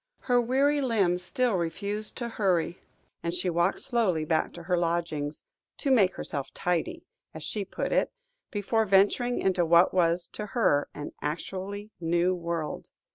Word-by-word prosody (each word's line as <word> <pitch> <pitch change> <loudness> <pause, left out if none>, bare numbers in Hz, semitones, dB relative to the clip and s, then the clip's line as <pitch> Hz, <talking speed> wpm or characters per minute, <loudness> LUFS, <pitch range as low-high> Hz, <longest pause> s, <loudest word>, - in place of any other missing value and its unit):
Her 245 -1 +3
weary 275 +4 +2
limbs 200 -9 +2
still 245 +6 0
refused 200 +5 -2
to 240 - -3
hurry, 185 -6 0 0.4
and 170 - -2
she 180 +1 -1
walked 170 +3 +1
slowly 200 -11 +1
back 160 0 +1
to 170 - -9
her 180 +1 +1
lodgings, 165 -4 -1 0.3
"to 280 - -1
make 200 -8 +4
herself 140 -3 -4
tidy," 175 -2 -1 0.3
as 160 - -7
she 200 +6 -3
put 195 - -4
it, - - +2 0.4
before 220 +2 0
venturing 205 +5 +3
into 185 -2 +2
what 170 +2 +5
was 175 -1 +3
to 210 - -6
her 145 -11 +3
an 145 0 -6
actually 195 +7 -4
new 175 +2 +2
world. 170 -3 -4
180 Hz, 155 wpm, -28 LUFS, 170-215 Hz, 0.4 s, what